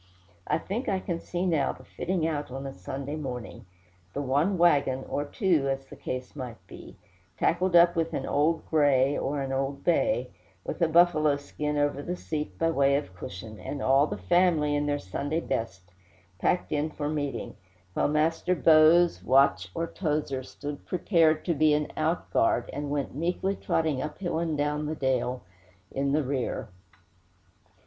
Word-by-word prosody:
I -, -, +2 dB
think 205 Hz, +9 st, -3 dB
I 190 Hz, -, +1 dB
can 170 Hz, -2 st, -3 dB
see 175 Hz, +2 st, -3 dB
now 160 Hz, -7 st, +1 dB
the -, -, -15 dB
fitting 180 Hz, -2 st, -2 dB
out 150 Hz, -3 st, -2 dB
on 135 Hz, +2 st, -6 dB
a 135 Hz, -, -5 dB
Sunday 135 Hz, +10 st, -5 dB
morning 125 Hz, -6 st, -6 dB, 0.5 s
the 140 Hz, -, -1 dB
one 145 Hz, +9 st, +1 dB
wagon, 140 Hz, -6 st, +3 dB
or 145 Hz, -, -2 dB
two, 165 Hz, -, +1 dB
as 135 Hz, 0 st, -2 dB
the -, -, -12 dB
case 130 Hz, +2 st, -6 dB
might 125 Hz, -5 st, -6 dB
be, -, -, -12 dB, 0.4 s
tackled 180 Hz, +1 st, +1 dB
up 170 Hz, +1 st, +7 dB
with 165 Hz, -1 st, 0 dB
an 135 Hz, -, -2 dB
"old 155 Hz, +3 st, +1 dB
gray" 145 Hz, -3 st, +3 dB
or 140 Hz, +1 st, -2 dB
an 135 Hz, -, -4 dB
"old 135 Hz, +1 st, -2 dB
bay," 225 Hz, +10 st, +1 dB, 0.3 s
with -, -, -5 dB
a 170 Hz, -, +5 dB
buffalo 160 Hz, -3 st, +4 dB
skin 150 Hz, +1 st, -4 dB
over 145 Hz, -1 st, +1 dB
the 175 Hz, +5 st, -3 dB
seat 155 Hz, -3 st, -5 dB
by 165 Hz, 0 st, +1 dB
way 140 Hz, -2 st, +3 dB
of 115 Hz, -10 st, -3 dB
cushion, 100 Hz, +4 st, -8 dB
and 145 Hz, -, -5 dB
all 135 Hz, +2 st, +4 dB
the 105 Hz, -, -4 dB
family, 150 Hz, -, +2 dB
in 145 Hz, 0 st, 0 dB
their 145 Hz, 0 st, +1 dB
Sunday 145 Hz, -, -3 dB
best, 115 Hz, -, -3 dB, 0.6 s
packed 180 Hz, -, 0 dB
in 150 Hz, +1 st, 0 dB
for 150 Hz, -1 st, -4 dB
meeting; 145 Hz, -2 st, -3 dB, 0.4 s
while -, -, +1 dB
Master 160 Hz, +4 st, +1 dB
Bose, 165 Hz, +1 st, +5 dB
Watch, 135 Hz, +2 st, +3 dB
or 165 Hz, 0 st, -1 dB
Towser 150 Hz, -6 st, -2 dB
stood 145 Hz, +2 st, -7 dB
prepared 165 Hz, -3 st, +2 dB
to 170 Hz, -, +1 dB
be 155 Hz, 0 st, +4 dB
an 150 Hz, 0 st, -2 dB
outguard, 155 Hz, -7 st, +1 dB
and 145 Hz, 0 st, -4 dB
went 145 Hz, -1 st, -2 dB
meekly 175 Hz, +6 st, -1 dB
trotting 155 Hz, -8 st, 0 dB
up 150 Hz, -, -5 dB
hill 175 Hz, -4 st, -2 dB
and 165 Hz, -3 st, -1 dB
down 150 Hz, +1 st, -1 dB
dale 130 Hz, -2 st, -1 dB, 0.5 s
in 140 Hz, +1 st, -1 dB
the 150 Hz, +1 st, +2 dB
rear. 130 Hz, -3 st, -2 dB
150 Hz, 170 wpm, -27 LUFS, 135-165 Hz, 0.6 s, up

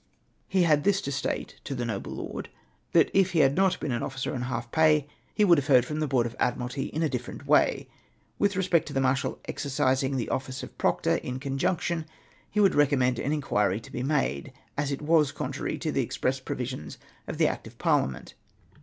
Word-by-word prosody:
He 190 Hz, -2 st, +2 dB
had 150 Hz, -3 st, +3 dB
this 200 Hz, +1 st, +3 dB
to 140 Hz, -, -4 dB
state 135 Hz, -, -3 dB
to 140 Hz, -, -4 dB
the 120 Hz, -1 st, -2 dB
noble 110 Hz, -4 st, -4 dB
lord, -, -, -6 dB, 0.4 s
that -, -, +4 dB
if 190 Hz, -1 st, +3 dB
he 165 Hz, -, +4 dB
had 135 Hz, -1 st, +4 dB
not 190 Hz, -1 st, +2 dB
been 150 Hz, -, -2 dB
an 120 Hz, -, -1 dB
officer 130 Hz, -1 st, -3 dB
on 125 Hz, -, -3 dB
half 120 Hz, -1 st, -4 dB
pay 155 Hz, -2 st, +4 dB, 0.3 s
he 210 Hz, -, +4 dB
would 170 Hz, -5 st, +6 dB
have 140 Hz, -, -5 dB
heard 125 Hz, -4 st, +5 dB
from 150 Hz, +3 st, -4 dB
the 155 Hz, -, 0 dB
Board 130 Hz, -4 st, +2 dB
of 120 Hz, -, -5 dB
Admiralty 125 Hz, +3 st, -1 dB
in 160 Hz, -, -2 dB
a -, -, +3 dB
different 125 Hz, -4 st, -5 dB
way. -, -, +3 dB, 0.5 s
With 200 Hz, -1 st, +2 dB
respect 180 Hz, -3 st, +2 dB
to 145 Hz, -, -6 dB
the 135 Hz, -, +1 dB
marshal 130 Hz, 0 st, 0 dB
exercising 135 Hz, -1 st, 0 dB
the 120 Hz, -, -2 dB
office 130 Hz, 0 st, -3 dB
of -, -, -9 dB
proctor, -, -, +2 dB
in 125 Hz, +1 st, -5 dB
conjunction, 155 Hz, +4 st, -1 dB, 0.4 s
he 210 Hz, -, -1 dB
would 200 Hz, -2 st, +5 dB
recommend 130 Hz, -4 st, +3 dB
an 140 Hz, -, -1 dB
inquiry 105 Hz, -9 st, +1 dB
to 110 Hz, -, -14 dB
be 125 Hz, -, -4 dB
made, 130 Hz, -, -1 dB, 0.2 s
as 145 Hz, 0 st, -1 dB
it 140 Hz, +2 st, -4 dB
was 150 Hz, -2 st, +4 dB
contrary -, -, -3 dB
to -, -, -2 dB
the -, -, +1 dB
express 130 Hz, +1 st, -1 dB
provisions 125 Hz, -, -5 dB, 0.3 s
of -, -, -5 dB
the -, -, +4 dB
Act -, -, -4 dB
of -, -, -14 dB
Par -, -, +3 dB
liament. 65 Hz, -2 st, -9 dB
135 Hz, 215 wpm, -27 LUFS, 125-155 Hz, 0.5 s, would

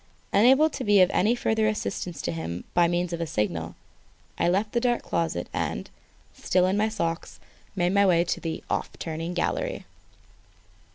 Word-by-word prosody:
Unable 265 Hz, +9 st, +6 dB
to 285 Hz, -, -5 dB
be 205 Hz, -2 st, +4 dB
of 185 Hz, -, +5 dB
any 220 Hz, +5 st, +2 dB
further 220 Hz, -2 st, +1 dB
assistance 185 Hz, -6 st, -3 dB
to -, -, -1 dB
him 80 Hz, +1 st, -5 dB
by 175 Hz, -1 st, +4 dB
means 175 Hz, 0 st, -1 dB
of 170 Hz, -, -3 dB
a 165 Hz, -, -2 dB
signal, 85 Hz, -, -2 dB, 0.6 s
I -, -, +1 dB
left 200 Hz, +4 st, 0 dB
the 240 Hz, -, +1 dB
dark 240 Hz, 0 st, 0 dB
closet 165 Hz, -, -2 dB
and, -, -, -3 dB, 0.4 s
still 180 Hz, 0 st, +1 dB
in 185 Hz, +1 st, +1 dB
my 215 Hz, +2 st, +2 dB
socks, 170 Hz, -6 st, -3 dB, 0.4 s
made 180 Hz, -1 st, +1 dB
my 200 Hz, 0 st, +4 dB
way 170 Hz, -2 st, +4 dB
to 175 Hz, -, -2 dB
the 165 Hz, -1 st, -5 dB
"off -, -, -1 dB
turning" 165 Hz, +2 st, -4 dB
gallery. -, -, -2 dB
180 Hz, 175 wpm, -26 LUFS, 165-215 Hz, 0.6 s, Unable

